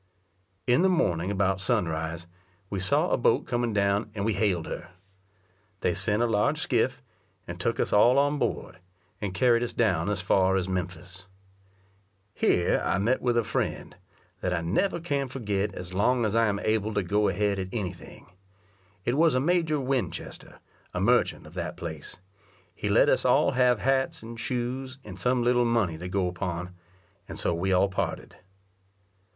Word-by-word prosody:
In 125 +5 +3
the 190 - +4
morning 90 - +1
about 95 -1 +1
sunrise, 80 -2 -1 0.5
we 100 - -2
saw 95 0 +1
a - - +3
boat - - +2
coming 120 -1 -1
down, 100 +1 +1
and 100 -1 -2
we 110 - +1
hailed 95 -4 0
her. 90 - -7 0.9
They 90 - +1
sent 105 +5 +1
a - - +3
large 105 -3 +1
skiff, - - 0 0.4
and - - -7
took - - -1
us - - 0
all 120 +5 +5
on 145 +1 +2
board, 95 -8 -3 0.4
and 100 -2 -2
carried 120 -2 +3
us 120 - -3
down 105 -4 +1
as 105 -1 -1
far 95 +1 +2
as 95 -1 0
Memphis. 90 0 -5 1.1
Here 90 - +2
I - - +1
met 115 +6 +1
with 120 -1 +1
a 120 - +3
friend, - - -3 0.4
that 90 - -2
I 85 - -1
never 170 - 0
can 145 -5 -1
forget 105 -6 -2
as 90 0 -7
long 120 +5 +2
as 105 - -1
I 115 0 +3
am 100 -1 0
able 110 -1 0
to 105 - +1
go 105 +4 +1
ahead 100 +1 0
at 95 - -3
any 95 -6 -3
thing; 90 - -14 0.8
it 120 - +1
was 160 -1 +4
a - - +3
Major 160 0 +1
Winchester, 130 -8 -4 0.4
a - - 0
merchant - - +2
of 75 - -13
that 85 -1 -5
place: 80 -3 -7 0.6
he - - -4
let - - +5
us - - +2
all - - +4
have 125 -2 +3
hats, 130 0 0
and 115 0 -8
shoes, 130 +2 -3
and - - -10
some 125 -1 +1
little 120 0 +3
money 110 -9 0
to 90 +1 -6
go 95 -1 0
upon, 90 0 -4 0.6
and - - -6
so - - 0
we 90 +3 -1
all 95 +1 +4
parted. 95 - -4
105 Hz, 180 wpm, -27 LUFS, 90-125 Hz, 1.1 s, all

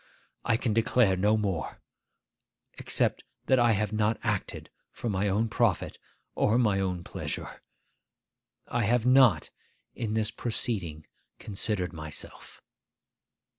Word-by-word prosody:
I 115 -2 +2
can 115 -3 -1
declare 115 -2 +3
no 105 +4 +2
more; 95 -7 -3 1.0
except - - 0 0.2
that 130 - +4
I 120 -1 +4
have 105 0 -1
not 110 +1 +1
acted 105 -4 -3 0.2
for 120 - -4
my 100 +1 0
own 105 +4 +1
profit 110 -5 0 0.3
or 110 +3 +2
my 105 -6 +2
own 90 -2 -2
pleasure. - - -6 1.1
I - - -1
have 120 +2 +2
not 125 - +5 0.4
in 110 -2 -3
this 110 -1 +1
proceeding 100 - -3 0.3
considered 100 -3 -2
myself. 80 -2 -8
105 Hz, 120 wpm, -28 LUFS, 95-115 Hz, 1.1 s, not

